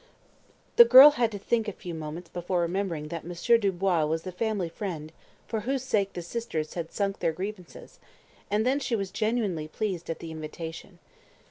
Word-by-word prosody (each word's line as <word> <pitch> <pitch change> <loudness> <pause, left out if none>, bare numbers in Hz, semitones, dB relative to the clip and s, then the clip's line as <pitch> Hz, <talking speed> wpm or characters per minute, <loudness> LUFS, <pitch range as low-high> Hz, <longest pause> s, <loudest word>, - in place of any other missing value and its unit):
The 475 - +12
girl 295 - +10
had 240 -6 0
to 205 - -5
think 225 +2 0
a - - -1
few 180 -2 -8
moments 160 +2 -6
before 175 +1 -2
remembering 170 -3 -2
that 170 0 -5
Monsieur 175 +8 +2
Dubois 190 -4 +1
was 160 +1 -1
the 185 - -5
"family 205 -1 -1
friend" 165 -4 -6 0.4
for 225 - -2
whose 260 +4 -2
sake 200 -6 0
the 175 - -5
sisters 170 -6 -4
had 165 -2 -5
sunk 200 -1 -2
their 165 - +1
grievances, 185 +1 -8 0.5
and 210 +2 +1
then 265 +3 +2
she 245 -4 -1
was 195 -3 -3
genuinely 205 -6 -1
pleased 180 0 -4
at 165 - -2
the 165 - -8
invitation. 160 +3 -8
190 Hz, 180 wpm, -27 LUFS, 165-220 Hz, 0.5 s, The